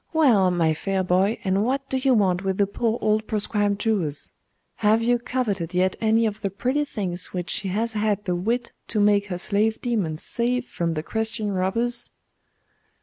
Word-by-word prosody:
'Well, 240 - +4
my 165 -3 +2
fair 190 +4 -1
boy, 185 +4 +2
and 195 +1 +1
what 270 +3 -1
do 265 - -3
you 260 -1 +3
want 190 -3 +2
with 190 -1 -1
the 200 - +3
poor 225 +3 -1
old 215 0 +1
proscribed 205 -1 0
Jewess? 180 -11 0 0.4
Have 220 +2 +3
you 240 +1 +2
coveted 205 -9 -2
yet 185 +1 +2
any 225 +1 +3
of 215 0 -3
the 200 - -1
pretty 255 +9 -1
things 185 -8 -2
which 180 -1 -3
she 200 - -2
has 220 +5 -1
had 210 -1 0
the 180 - 0
wit 235 +7 -1 0.2
to 215 - -1
make 205 0 +3
her 180 -3 -3
slave 215 +4 0
demons 195 -11 -2
save 245 +1 0
from 170 -1 -3
the 155 - -3
Christian 220 +1 -2
robbers? 230 +6 +1
210 Hz, 185 wpm, -24 LUFS, 185-230 Hz, 0.4 s, Well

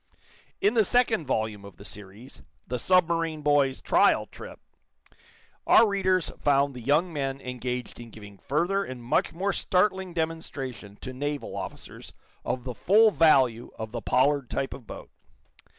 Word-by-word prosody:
In 205 - +3
the 225 -2 +4
second 225 - +1
volume 110 -4 -2
of 100 -4 -13
the 100 - -13
series, 105 +5 -11 0.2
"The 125 - -4
Submarine 165 -2 +1
Boys' 145 -3 +2
Trial - - +3
Trip," - - -11 1.1
our 225 - +7
readers 185 -4 +1
found 140 -1 +2
the 125 - -9
young 150 +8 +1
men 135 -2 -3
engaged 125 -1 -5
in 120 -1 -10
giving 105 -3 -13
further 175 +7 0
and 130 -8 -8
much 120 - +1
more 195 +4 -2
startling 190 -1 0
demonstration 140 - -4
to 130 - -7
naval 145 +2 -4
officers - - -8 0.3
of 125 - -3
the 125 -1 -5
full 210 - +4
value 135 - +3
of 110 -1 -6
the 120 0 -5
Pollard 135 +3 +1
type 135 - -2
of 120 - -12
boat. - - -10
140 Hz, 150 wpm, -26 LUFS, 125-170 Hz, 1.1 s, our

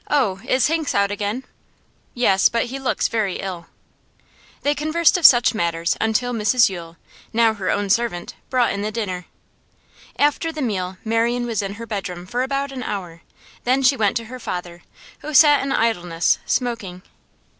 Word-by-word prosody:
'Oh, 220 -10 +1
is 260 -1 +3
Hinks 320 -1 0
out 200 0 +2
again?' 205 +5 -3 0.7
'Yes, 195 -6 +4
but 230 -1 0
he 260 +3 -6
looks 270 - 0
very 215 -5 -1
ill.' 180 -3 -6 1.0
They 290 - +2
conversed 310 +2 +2
of 355 -4 +8
such 240 -1 +5
matters 170 -4 0
until 225 +3 0
Mrs 230 +1 +3
Yule 170 -3 -8 0.3
now 230 -1 +3
her 200 -4 -4
own 205 0 0
servant 230 -6 -1 0.2
brought 250 -2 +2
in 200 - -3
the 210 +1 -2
dinner. 190 -5 -4 0.9
After 295 +3 +1
the 310 - -8
meal, 190 -5 -3
Marian 235 +2 +1
was 230 -4 -1
in 200 0 -5
her 230 +2 -8
bedroom 190 -5 -5
for 245 +6 -2
about 275 +1 -2
an 260 -2 -6
hour; 180 -7 -5 0.4
then 260 +2 +2
she 265 +2 +5
went 215 -2 +1
to 230 - -5
her 255 +3 -9
father, 175 -5 -6 0.4
who 305 0 -6
sat 295 -1 +7
in 275 - -3
idleness, 175 -9 +1
smoking. 210 -8 -2
225 Hz, 170 wpm, -21 LUFS, 190-255 Hz, 1.0 s, of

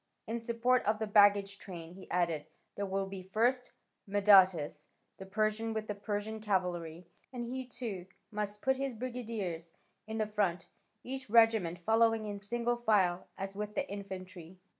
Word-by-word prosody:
In 230 +1 -3
support 235 +2 +2
of 215 +1 +2
the 220 - -2
baggage 205 -1 +5
train," 170 -3 -9
he 190 +1 -12
added, 170 -4 0 0.3
"there 200 0 -3
will 195 0 -1
be, 195 -1 -7
first, 235 +7 +1 0.4
Madatas 190 -7 +5 0.3
the 190 - -9
Persian 215 +2 0
with 215 -1 -2
the 210 - -3
Persian 205 +1 -3
cavalry, 180 -5 -1 0.3
and 245 -2 -4
he 255 +1 -4
too 210 -8 -5 0.2
must 210 -1 -3
put 265 0 +2
his 270 -2 -2
brigadiers 220 -9 -4 0.3
in 220 0 -4
the 215 - +1
front, 200 -5 0 0.4
each 260 -1 -5
regiment 220 -6 +4
following 225 +4 +3
in 205 -1 -4
single 235 +3 -1
file, 200 -7 +2
as 195 0 -4
with 210 +1 -4
the 285 -1 -1
infantry. 185 -3 -8
205 Hz, 160 wpm, -33 LUFS, 190-225 Hz, 0.4 s, baggage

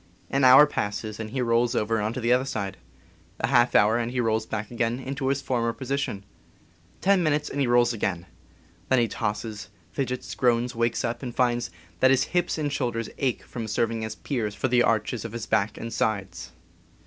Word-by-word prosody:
An 135 0 +1
hour 130 +3 +9
passes, 110 -5 -3
and 110 -1 -5
he 125 +2 -2
rolls 115 0 +2
over 110 0 +1
on 105 +1 -1
the 120 0 +1
other 125 +1 +3
side; 100 -8 -4 0.6
a - - +1
half 120 -2 +3
hour, 110 +3 +5
and 120 0 -1
he 125 +1 -3
rolls 110 -2 0
back 110 0 -4
again 120 +1 -1
into 135 0 -4
his 135 0 0
former 115 -2 0
position; 130 -6 -3 0.8
ten 195 -1 +4
minutes, 150 -2 +1
and 140 - -2
he 135 - +2
rolls 120 0 +4
again; 95 -6 -2 0.6
then 130 - +4
he 120 -1 +3
tosses, 105 -1 -4 0.2
fidgets, 125 -2 -3
groans, 120 0 +1
wakes 115 +1 0
up, 120 0 -3
and 125 -3 -6
finds 120 -3 +1 0.3
that 130 - +5
his 135 0 +4
hips 175 -1 +1
and 145 -2 -2
shoulders 120 -5 -2
ache 130 -4 -1
from 115 -3 -6
serving 115 +1 -1
as 110 - -4
piers 110 -7 -3
for - - -1
the 125 -1 +3
arches 115 0 +1
of 115 -1 -7
his 115 -2 -4
back 110 -1 0
and 115 0 -6
sides. 105 -4 -2
120 Hz, 195 wpm, -26 LUFS, 110-130 Hz, 0.8 s, hour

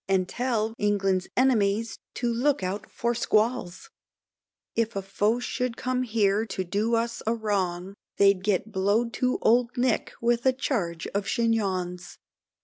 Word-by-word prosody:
And 190 -1 +2
tell 225 -2 -1 0.6
enemies 225 -3 +2 0.2
to 240 -1 -1
look 265 0 +1
out 200 +4 -3
for 235 0 -1
squalls, 220 -5 0 0.8
If 230 -1 0
a 195 - -1
foe 205 +4 +1
should 250 -1 -3
come 255 0 -1
here 215 -3 +2
to 195 -4 -3
do 205 +6 0
us 230 0 -1
a 230 - +2
wrong, 195 -4 -2 0.2
They'd 195 -2 +4
get 210 +2 0
blow'd 210 +5 +1
to 255 0 +2
old 240 +2 +3
Nick 245 -2 0
with 235 0 +1
a 260 - +5
charge 195 - -2
of 200 0 -1
chignons. 190 -6 -1
220 Hz, 140 wpm, -26 LUFS, 195-240 Hz, 0.8 s, a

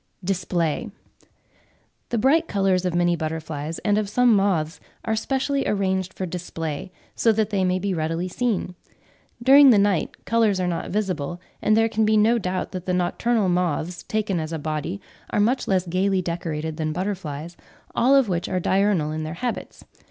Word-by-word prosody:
DISPLAY. 180 +1 -1 1.2
The 235 - -1
bright 275 +8 +3
colours 195 -2 +1
of 180 -1 -1
many 175 0 +3
butterflies 160 -1 -4
and 205 0 +3
of 210 -2 -2
some 245 0 +4
moths 180 -5 +1 0.3
are 220 - 0
specially 270 +4 -1
arranged 190 -2 -1
for 190 - -3
display, 165 -1 -5 0.2
so 230 - +3
that 215 0 0
they 195 -2 +1
may 185 0 +2
be 195 +1 -1
readily 165 +2 -2
seen. 205 -2 -1 0.7
During 275 +2 +8
the 230 - +6
night 200 -5 0
colours 225 -4 +2
are 180 - 0
not 175 -1 -2
visible, 180 -5 -2 0.2
and 215 +1 +3
there 225 0 +4
can 220 0 0
be 215 0 +3
no 225 +3 +4
doubt 185 -2 -3
that 185 -1 -6
the 180 - +1
nocturnal 200 +4 +1
moths, 175 -1 -1
taken 210 -4 -1
as 155 0 -4
a 165 - -2
body, 155 +5 -3 0.3
are - - 0
much 245 +5 +1
less 190 -2 +1
gaily 185 +2 +1
decorated 160 -2 -3
than 155 -1 -2
butterflies, 175 -4 -4 0.4
all 260 +4 +4
of 270 -4 +4
which 175 -2 -2
are 185 - 0
diurnal 190 -4 +1
in 155 0 -3
their 155 +1 -5
habits. 240 +6 -5
185 Hz, 175 wpm, -23 LUFS, 170-215 Hz, 1.2 s, During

